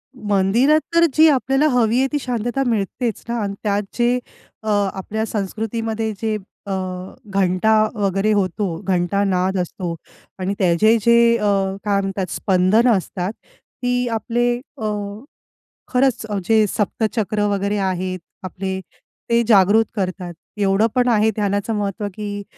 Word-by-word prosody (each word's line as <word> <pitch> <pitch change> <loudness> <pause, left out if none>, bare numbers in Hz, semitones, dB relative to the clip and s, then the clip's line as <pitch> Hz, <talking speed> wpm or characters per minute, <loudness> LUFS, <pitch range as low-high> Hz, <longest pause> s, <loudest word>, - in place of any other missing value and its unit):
मंदिरात 215 +7 +3 0.2
तर 335 - +6
जी 315 +3 +6
आपल्याला 270 +1 +2
हवी 240 -3 +2
आहे 270 - +3
ती 295 - 0
शांतता 245 +1 -2
मिळतेच 225 +1 -1
ना 235 0 -2
अन् 200 -1 -2
त्यात 205 -1 +1 0.2
जे 240 +1 +3 0.5
अ, - - -8 0.3
आपल्या 215 +3 -3
संस्कृतीमध्ये 220 +1 -3
जे 220 -1 0 0.3
अ, 200 - -5 0.6
घंटा 190 +2 +2 0.2
वगैरे 200 +1 +1
होतो, 190 -2 0
घंटानाद 190 +1 +1
असतो 175 -1 -3 0.4
आणि 190 +1 -1
त्याचे 200 +5 +4
जे 235 +2 +4 0.2
अ, 210 - -4 0.4
काय 200 -1 +2
म्हणतात 195 -1 -2
अ, - - -8
स्पंदनं 195 +6 +3
असतात 180 +1 -4 0.5
ती 245 0 +1
आपले 240 +2 0 0.3
अ, 215 - -2 1.1
खरंच 255 -3 +2 0.2
जे 220 -1 +4
सप्तचक्र 215 0 -1
वगैरे 200 +1 0
आहेत, 185 -1 -2 0.2
आपले 190 +1 -4 0.5
ते 235 0 +4
जागृत 210 +1 +5
करतात. 185 -2 -3 0.2
एवढं 200 +2 +3
पण 250 0 +3
आहे 220 -1 +3
ध्यानाचं 205 +1 -1
महत्त्व, 205 0 -2
की 205 0 -5
210 Hz, 135 wpm, -20 LUFS, 195-230 Hz, 1.1 s, तर